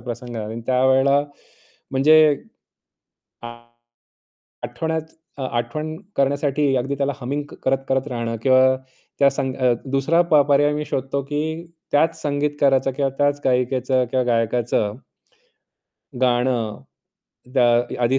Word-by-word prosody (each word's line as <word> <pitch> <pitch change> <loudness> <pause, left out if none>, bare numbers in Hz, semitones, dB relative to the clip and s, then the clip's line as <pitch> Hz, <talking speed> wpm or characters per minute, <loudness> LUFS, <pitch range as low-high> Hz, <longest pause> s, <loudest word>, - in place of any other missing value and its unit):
प्रसंग 120 +1 -7
झाला 110 -2 -4
आणि 110 +2 -6
त्यावेळेला 130 +2 +3 0.7
म्हणजे 135 +4 +5 2.5
आठवणच 160 -1 -4 0.2
अ, 135 - -4
आठवण 130 +6 -3 0.2
करण्यासाठी 140 0 +1
अगदी 135 +3 -1
त्याला 140 0 0
हमिंग 140 +4 -3
क - - -11
करत-करत 135 0 0
राहणं 115 -2 -3
किंवा 130 0 +4 0.4
त्या 140 0 +5
संग 130 -1 -3
अ, 125 -2 +2
दुसरा 135 +6 +2
प - - +4
पर्याय 145 +1 +4
मी 150 0 -3
शोधतो, 135 0 -3
की 155 +4 -4 0.3
त्याच 155 +3 +2
संगीतकाराचा 145 -2 +1
किंवा 135 +1 -1
त्याच 145 0 +1
गायिकेचं 130 0 +1
किंवा 130 -1 +1
गायकाचं 115 -2 0 1.3
गाणं 120 -3 +1 0.8
द - - +1 0.4
आधी 125 +3 +2
135 Hz, 115 wpm, -21 LUFS, 125-145 Hz, 2.5 s, म्हणजे